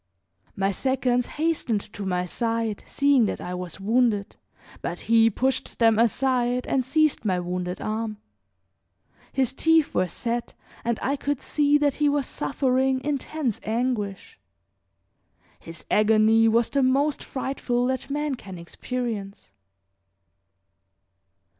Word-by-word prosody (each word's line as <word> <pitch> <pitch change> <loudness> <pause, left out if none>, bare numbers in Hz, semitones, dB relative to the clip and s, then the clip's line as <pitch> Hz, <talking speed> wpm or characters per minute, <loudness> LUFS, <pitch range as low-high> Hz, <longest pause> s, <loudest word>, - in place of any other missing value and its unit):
My 195 0 +1
seconds 250 +2 0
hastened 295 -9 -1
to 200 -1 -5
my 180 -1 0
side, 225 +2 -2
seeing 280 -4 +3
that - - -3
I 180 - -5
was 180 -1 -6
wounded; 220 -1 +1 0.5
but 175 - -4
he 225 0 +4
pushed 260 +5 -1
them 225 -2 +4
aside 245 +1 +1
and 265 - +1
seized 310 +2 +1
my 185 -4 +1
wounded 180 0 -3
arm. 215 0 -3 1.1
His 265 -2 0
teeth 325 +2 +3
were 185 - +1
set 235 +7 -4 0.3
and 235 -1 0
I 275 - +1
could 285 -1 -2
see 295 -1 +2
that 290 -2 +2
he 295 - +5
was 285 -1 0
suffering 260 -1 0
intense 285 -3 -2
anguish. 225 - -3 1.2
His 165 -1 -9
agony 220 +1 +4
was 230 +1 +2
the 280 - +2
most 275 +3 +2
frightful 255 -2 -2
that 260 +1 -2
man 295 0 -1
can 195 -7 -8
experience. 205 - -5
240 Hz, 125 wpm, -25 LUFS, 210-270 Hz, 1.2 s, he